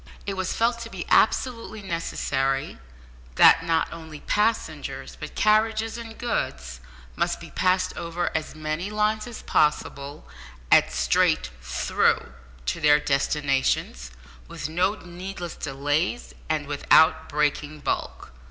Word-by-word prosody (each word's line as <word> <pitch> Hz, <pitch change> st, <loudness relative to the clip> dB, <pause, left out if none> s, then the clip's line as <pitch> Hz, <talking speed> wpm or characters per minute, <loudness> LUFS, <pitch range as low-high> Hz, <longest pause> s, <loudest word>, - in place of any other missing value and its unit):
It 200 Hz, -, -2 dB
was 190 Hz, -1 st, -2 dB
felt 235 Hz, +1 st, +1 dB
to 230 Hz, -1 st, -7 dB
be 190 Hz, -5 st, -6 dB
absolutely 230 Hz, -2 st, +2 dB
necessary 135 Hz, -, -2 dB, 0.6 s
that -, -, +7 dB
not 165 Hz, -1 st, 0 dB
only 160 Hz, -2 st, -10 dB
passengers, 220 Hz, +2 st, -1 dB
but -, -, -9 dB
carriages 220 Hz, +1 st, +2 dB
and 230 Hz, -1 st, -8 dB
goods, 60 Hz, -, -3 dB, 0.4 s
must -, -, -1 dB
be -, -, -11 dB
passed 185 Hz, 0 st, +1 dB
over 170 Hz, 0 st, -3 dB
as 155 Hz, -, -3 dB
many 155 Hz, +4 st, -3 dB
lines 215 Hz, +1 st, 0 dB
as 240 Hz, -, -9 dB
possible, 145 Hz, -1 st, 0 dB, 0.4 s
at -, -, +6 dB
straight 60 Hz, -1 st, +2 dB
"through" 65 Hz, 0 st, 0 dB, 0.3 s
to -, -, -2 dB
their 150 Hz, -1 st, +6 dB
destinations, 140 Hz, -, 0 dB, 0.4 s
with -, -, -5 dB
no 180 Hz, +6 st, +1 dB
needless 180 Hz, -1 st, -7 dB
delays, 145 Hz, -, -2 dB, 0.2 s
and 155 Hz, -2 st, 0 dB
without 145 Hz, +2 st, +4 dB
"breaking 150 Hz, +1 st, -1 dB
bulk." -, -, -3 dB
165 Hz, 125 wpm, -25 LUFS, 145-210 Hz, 0.6 s, that